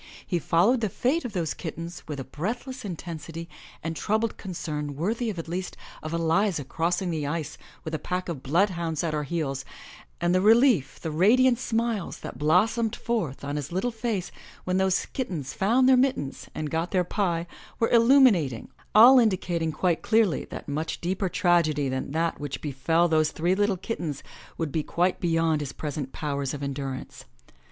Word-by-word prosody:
He 175 - 0
followed 195 +11 +3
the 215 - 0
fate 265 - 0
of 235 - -5
those 170 -5 -1
kittens 165 +1 -6
with 150 -2 -5
a - - -3
breathless 235 - -5
intensity 165 -3 -6 0.4
and 165 0 -3
troubled 220 +6 0
concern 150 -6 -5
worthy 220 - -1
at 170 -6 -5
least 180 +2 -4 0.2
of 155 - -5
Eliza 165 +1 +1
crossing 175 +6 -1
the 155 -3 -2
ice 155 0 -3 0.3
with 160 - -6
a 155 - -1
pack 180 +4 -3
of 165 -7 -4
bloodhounds 170 0 0
at 165 -2 -1
her 150 -1 -1
heels, 135 -4 -2 0.6
and 175 +1 +1
the 185 - +3
relief, 220 - +4
the 160 - -4
radiant 240 +9 +4
smiles 230 -5 -1
that - - -8
blossomed 215 +9 +2
forth 195 - -2
on 145 +1 -3
his 145 +1 -5
little 190 +8 -1
face 225 -5 -3 0.3
when 185 0 0
those 190 0 +2
kittens 175 - -4
found 240 +7 +3
their 260 - +7
mittens 250 - 0
and 155 -1 -3
got 165 +2 -1
their 185 -2 +2
pie 175 -2 -1 0.3
were 230 - +1
illuminating, 230 - +4 0.3
all 250 +5 +9
indicating 180 -7 +1
quite 165 +2 0
clearly 220 -6 +2
that - - -8
much 155 +3 -3
deeper 185 +2 -1
tragedy 160 -6 +2
than 130 0 -3
that 165 +2 -1
which 145 -2 -4
befell 155 +4 +1
those 155 -2 +3
three 170 +4 0
little 205 0 +1
kittens 170 - -4 0.3
would 160 -3 -2
be 160 - 0
quite 175 +4 0
beyond 165 -2 +1
his 140 -2 -4
present 145 -3 -4
powers 140 -2 -3
of 145 - -6
endurance. 135 -1 -5
170 Hz, 175 wpm, -26 LUFS, 155-210 Hz, 0.6 s, all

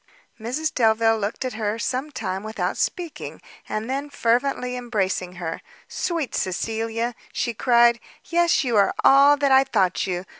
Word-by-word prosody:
Mrs 255 +8 -3
Delvile 225 -1 +3
looked 210 +5 -3
at 255 - -3
her 215 0 -2
some 255 +5 -2
time 190 -9 -4
without 220 +3 -3
speaking, 345 -4 -4 0.3
and 215 +1 -3
then, 275 +3 -3
fervently 250 0 0
embracing 195 -7 -2
her, 175 -2 -5 0.3
"sweet 335 -6 -3
Cecilia!" 225 +5 -2 0.2
she 235 - -2
cried, 235 0 +4 0.3
"yes, 340 0 +2
you 245 -3 -1
are 200 - +3
all 280 +2 +6
that 280 -1 +1
I 265 0 +7
thought 195 -10 0
you! 180 0 -3
235 Hz, 150 wpm, -23 LUFS, 215-270 Hz, 0.3 s, I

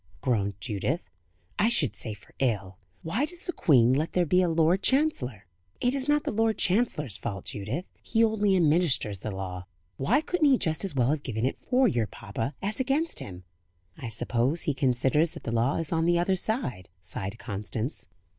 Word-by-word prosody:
groaned 100 -6 0
Judith; 105 - -3 0.5
"I 220 - +4
should 160 - +2
say 110 -3 -3
for 105 - -21
ill. 100 -7 -1 0.2
Why 200 - -1
does 350 +3 -9
the 355 - -2
Queen 125 -5 +4
let 150 +4 0
there 180 -1 +2
be 180 +3 +3
a 180 - +2
Lord 165 +3 +3
Chancellor?" 165 - 0 0.3
"It 245 +1 +1
is 275 0 -2
not 295 0 +3
the - - -2
Lord 225 0 +1
Chancellor's 180 - 0
fault, 100 -4 -5
Judith. 110 - -4
He 225 0 +2
only 210 -3 +2
administers 155 - +2
the 110 - -4
law." 95 -2 -6 0.3
"Why 240 - +2
couldn't 315 -2 +2
he 265 - +5
just 160 -3 +1
as 190 -7 -2
well 125 0 +3
have 155 -1 -1
given 120 -4 -2
it 130 - -2
for 255 0 +2
your 120 - +1
papa, 115 +7 -5
as 205 +4 -2
against 280 +6 0
him?" 90 -1 -8 0.5
"I 125 - -7
suppose 120 +7 0
he 150 - +1
considers 135 +4 +1
that - - -9
the - - -3
law 115 +4 +1
is 165 -2 -2
on 165 -1 +1
the 175 0 +3
other 175 +2 +2
side," 185 - -1
sighed 95 +4 -5
Constance. 110 +4 -4
150 Hz, 195 wpm, -27 LUFS, -, 0.5 s, he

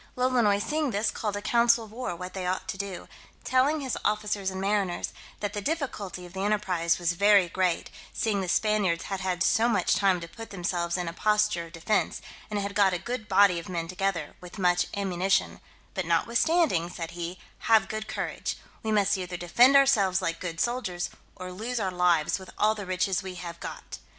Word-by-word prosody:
Lolonois 250 -5 +3
seeing 300 +7 -1
this, 215 0 0
called 210 -2 -3
a 205 - -5
council 235 -1 +4
of 210 - -16
war 235 -5 -4
what 180 +2 -7
they 185 -2 -3
ought 185 +1 -2
to 220 - -2
do, 195 -2 -6 0.4
telling 275 +4 +2
his 265 -3 -2
officers 210 -2 0
and 190 0 -5
mariners, 195 -2 -1 0.3
"That 205 -1 -2
the 205 - -3
difficulty 205 - -3
of 175 - -13
the 190 - -6
enterprise 185 -5 +1
was 175 -1 +1
very 200 0 +5
great, 180 0 -1 0.2
seeing 210 -4 0
the 185 - -3
Spaniards 200 -5 +1
had 195 -1 -4
had 185 -1 -1
so 230 +4 +3
much 185 -7 +2
time 195 -3 +3
to 170 - -7
put 225 +6 -10
themselves 175 -2 -2
in 180 -1 -3
a 165 - -4
posture 210 -3 +1
of 165 - -18
defence, 185 +5 0 0.3
and 210 - -2
had 200 0 -2
got 200 -2 +4
a - - 0
good 240 +4 -5
body 195 -3 +5
of 170 - -9
men 170 -2 -3
together, 185 -3 -2
with 180 +3 -10
much 180 -1 +2
ammunition; 195 -1 0 0.3
but 190 -4 -3
notwithstanding," 235 - +2
said 170 -2 -6
he, 175 +1 -5 0.3
"have 220 -2 +7
a - - -12
good 215 +2 -5
courage; - - -3 0.2
we 220 - -2
must 200 -1 +3
either 180 -1 -4
defend 240 +11 +5
ourselves 215 -10 +5
like 165 -3 -2
good 165 -3 -5
soldiers, 235 -8 -1 0.2
or 185 0 -7
lose 230 +6 -3
our 190 -3 -1
lives 180 -2 +2
with 190 - -11
all 215 +1 +3
the 205 -3 -7
riches 185 +1 0
we 190 -2 -7
have 170 -1 -7
got. - - -8
195 Hz, 205 wpm, -27 LUFS, 180-215 Hz, 0.4 s, have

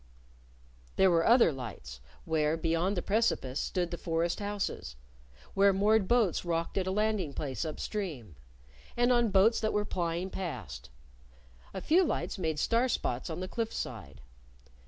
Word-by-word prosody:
There 190 -1 +5
were 165 -1 +3
other 235 -7 +6
lights 110 - -8 0.3
where, 155 0 +1
beyond 165 +4 0
the 175 - -1
precipice, 200 - 0
stood 175 -2 -2
the 175 - -5
forest 170 0 -1
houses; 205 - -4 0.6
where 200 0 +5
moored 205 +1 +3
boats 230 -7 +2
rocked 170 -1 -2
at 185 - -2
a - - 0
landing 205 -7 0
place 135 -1 -3
up 155 -2 -5
stream; 150 - -5 0.6
and 245 +1 +3
on 240 -2 +3
boats 205 +4 +4
that 220 - -1
were 210 0 0
plying 175 0 -2
past. 95 - -6 0.8
A 190 - -6
few 345 - +4
lights 290 - -2
made 160 -3 -1
star 230 +10 +2
spots 125 - -2
on 160 +2 -4
the 185 - -3
cliff 225 +2 -3
side. 75 - -6
180 Hz, 155 wpm, -30 LUFS, 155-210 Hz, 0.8 s, other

